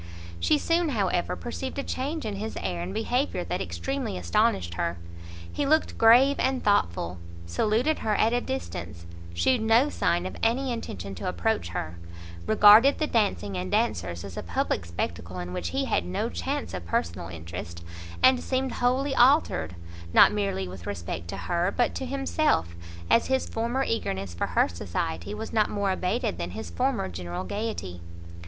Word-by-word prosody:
She 85 - +3
soon, 335 - +1
however, 195 -8 0
perceived 260 +3 -5
a 280 - -1
change 285 +3 -3
in 205 -2 -3
his 220 +2 -5
air 85 -1 -3
and 90 +2 -4
behaviour 250 - -1
that - - -3
extremely 270 - -3
astonished 85 0 +1
her; 85 0 -2 0.6
he 285 - -1
looked 315 +2 +2
grave 250 +5 +6
and 260 0 0
thoughtful, 90 - +1 0.3
saluted 220 - +1
her 215 -1 0
at 220 +3 +3
a 245 - +2
distance, 85 - -5 0.3
shewed 245 - +2
no 225 +6 +4
sign 175 -9 0
of 185 - -5
any 250 +3 +1
intention 100 - -5
to 90 - -3
approach 85 -1 0
her, 85 0 -5 0.5
regarded 220 +5 +7
the 310 - +1
dancing 200 - 0
and 90 0 -3
dancers 85 0 0
as 95 -3 -8
a - - -2
public 85 - -2
spectacle 85 +1 -4
in 90 0 -5
which 90 -1 -3
he - - -1
had - - +1
no 90 +1 -2
chance 85 0 -3
of 90 -2 -6
personal 85 0 -1
interest, 85 0 -7 0.4
and 255 -1 +6
seemed 260 0 -1
wholly 260 +3 +1
altered, 245 - +3 0.4
not - - +8
merely 200 - -1
with 90 -1 -9
respect 85 -3 -5
to - - -5
her, 175 +2 0
but 245 - +2
to 265 - -4
himself, 270 - 0 0.3
as 230 - +4
his 265 0 +1
former 235 +4 -1
eagerness 95 - -2
for 85 - -2
her - - +3
society 85 - -4
was 220 +1 -6
not 215 -2 +3
more 200 -2 0
abated 185 - -1
than 85 0 -3
[his] 110 -6 -6
former 85 +2 0
general 90 0 -5
gaiety. 95 - -4
180 Hz, 170 wpm, -27 LUFS, -, 0.6 s, not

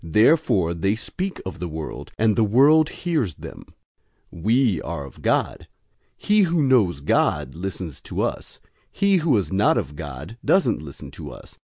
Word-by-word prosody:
Therefore 105 - +3
they 95 +5 0
speak 185 +11 -5
of 95 - -6
the 90 - -3
world, 80 -1 -7
and 110 -1 +2
the 115 - +3
world 145 +9 +5
hears 150 - -2
them. - - -10 0.7
004:006 85 - -11
We 115 - +2
are 70 - -5
of 70 - -14
God. - - 0 0.5
He 210 0 +3
who 170 -4 +2
knows 110 - +2
God 70 - +1
listens 90 -4 -6
to - - -3
us. - - -4 0.3
He 200 -1 +2
who 155 -8 +2
is 95 - -2
not 100 +2 +3
of 75 - -3
God 75 - -8
doesn't 190 - +2
listen 70 -3 -10
to - - -9
us. - - -13
105 Hz, 170 wpm, -23 LUFS, -, 0.7 s, world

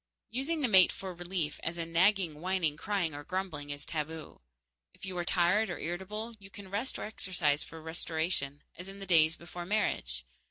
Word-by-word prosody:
Using 285 +7 0
the 265 - +4
mate 190 -5 +8
for 190 -1 -5
relief, 175 -3 -2
as 165 +1 -3
in 165 0 -4
nagging, 175 -4 +4
whining, 180 -4 +1
crying, 175 -1 0
or 145 0 -6
grumbling, 175 -5 -3
is 145 0 -4
taboo. 155 - -4 0.5
If - - -8
you 190 -1 -4
are - - +1
tired 185 +5 +3
or 175 - -2
irritable, 205 +7 -4
you 195 -1 -12
can 195 -1 -10
rest 220 +6 0
or - - -4
exercise 175 -8 +1
for 165 - -10
restoration, 160 -3 -1
as 180 +3 -8
in 195 - -8
the 195 - -6
days 165 -3 +5
before 175 +1 -7
marriage. 175 - 0
175 Hz, 190 wpm, -32 LUFS, 160-195 Hz, 0.5 s, mate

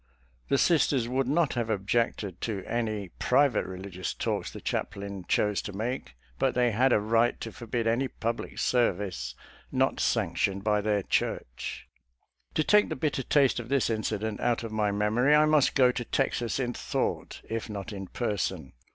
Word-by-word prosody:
The 140 - +3
Sisters 135 -6 +3
would 130 +1 0
not 150 +2 +2
have 120 -2 -2
objected 105 -2 -1
to 100 -5 -3
any 110 -5 -2
private 135 -2 +3
religious 95 0 -5
talks - - -2
the - - -9
chaplain 100 -2 -4
chose 105 -1 +2
to 105 - -7
make, 110 - -4 0.2
but - - +1
they 125 -1 +3
had 125 +5 +3
a 110 - +5
right 115 +3 +2
to 115 - -5
forbid 115 0 -3
any 120 +4 +2
public 115 -1 -4
service 95 - 0 0.4
not - - +1
sanctioned 100 0 0
by 105 -1 +2
their 105 -1 +1
Church. - - -2 0.7
To 155 - +3
take 210 +5 +4
the - - -2
bitter 140 0 -1
taste 135 -1 +3
of 120 0 -7
this 135 -4 +2
incident 110 -1 -2
out 120 -1 +1
of 115 - -5
my 105 -1 +1
memory, 110 +8 +3
I 150 0 +6
must 155 -2 +3
go 130 -3 +5
to 125 -1 -3
Texas 120 -2 -1
in 125 -2 -1
thought, - - -3
if 115 0 -4
not 105 0 -5
in 95 -1 -6
person. 95 - -2
115 Hz, 170 wpm, -28 LUFS, 100-125 Hz, 0.7 s, I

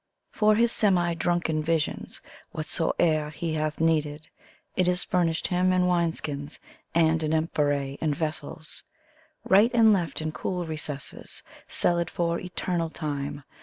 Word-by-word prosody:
For 215 0 +3
his 235 +1 +3
semi 180 -7 +2
drunken 170 -2 0
visions 160 -1 -2 0.3
whatsoever 155 0 0
he 160 +1 -4
hath 155 -1 -2
needed, 155 -1 0 0.5
It 185 -1 +2
is 180 0 +3
furnished 170 -3 0
him 180 +1 +2
in 185 0 +3
wine 170 -2 +2
^skins, 145 -2 -6 0.4
and 165 -1 +3
in 155 0 0
amphor» 145 -3 0
and 150 -2 +1
vessels. 155 0 -5 0.6
Right 205 +5 +5
and 225 -2 +6
left 175 -4 -1
in 155 0 -2
cool 180 +2 -3
recesses, 150 -3 -5 0.2
cellared 170 -1 +1
for 170 -1 -1
eternal 180 -2 -2
time. 145 -2 -4
165 Hz, 135 wpm, -26 LUFS, 155-180 Hz, 0.6 s, and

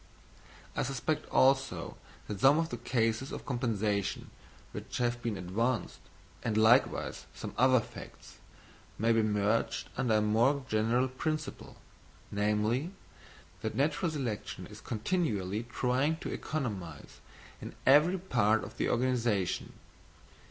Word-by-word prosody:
I - - 0
suspect, 135 +4 -2
also, 135 0 +2 0.3
that 105 -2 -5
some 135 +4 +6
of 165 0 0
the 120 - -4
cases 115 +1 0
of - - -6
compensation 110 -6 -1 0.4
which - - -6
have 120 0 0
been 115 -3 -2
advanced, 110 +7 -1 0.4
and 110 -2 -1
likewise 115 +4 +3
some - - -6
other 130 +1 +5
facts, - - -11 0.6
may 115 +2 +2
be 115 - +3
merged 105 +1 0
under 120 -4 +1
a 105 - +4
more 120 +6 +2
general 115 +4 +2
principle, 155 +3 -4 0.5
namely, 105 +8 +1 0.7
that 110 - -3
natural 150 +5 +1
selection 130 -9 -4
is - - -12
continually 110 - -1
trying 135 +6 +1
to - - -5
economise 100 - -5 0.4
in - - -8
every 150 +7 +6
part 110 - +2
of - - -9
the - - 0
organisation. 120 -6 0
120 Hz, 125 wpm, -31 LUFS, 110-135 Hz, 0.7 s, some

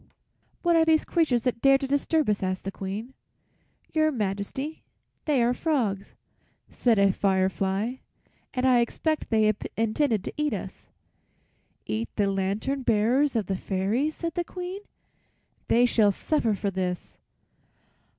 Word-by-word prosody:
"What 345 -1 +3
are 325 - +5
these 320 -1 +3
creatures 275 -9 +1
that 245 -2 -1
dare 275 0 +6
to 270 - -4
disturb 285 +3 +1
us?" 210 -1 +1
asked 185 -1 -2
the 195 - -4
Queen. 200 +7 -6 0.8
"Your 310 -1 +3
Majesty, 220 +6 -3 0.4
they 280 -6 +2
are 240 +1 +2
frogs," 235 -10 -1 0.6
said 235 -3 +2
a 200 -1 +4
fire 190 -1 +2
fly, 195 +7 -2 0.5
"and 255 0 -1
I 255 -2 +5
expect 310 +6 -1
they 215 -1 +3 0.2
intended 225 -1 +1
to - - -5
eat 300 0 0
us." - - -8 1.0
"Eat 225 +2 -3
the 200 -2 +1
lantern 200 +8 -1
bearers 245 +5 +2
of 220 -3 +1
the 190 - -2
fairies!" 205 +12 -1
said 335 -1 -4
the 350 - -1
Queen. 365 +3 -6 0.9
"They 240 +1 +4
shall 220 -4 +4
suffer 230 0 0
for 200 0 -2
this." 180 -1 -4
235 Hz, 145 wpm, -26 LUFS, 200-290 Hz, 1.0 s, dare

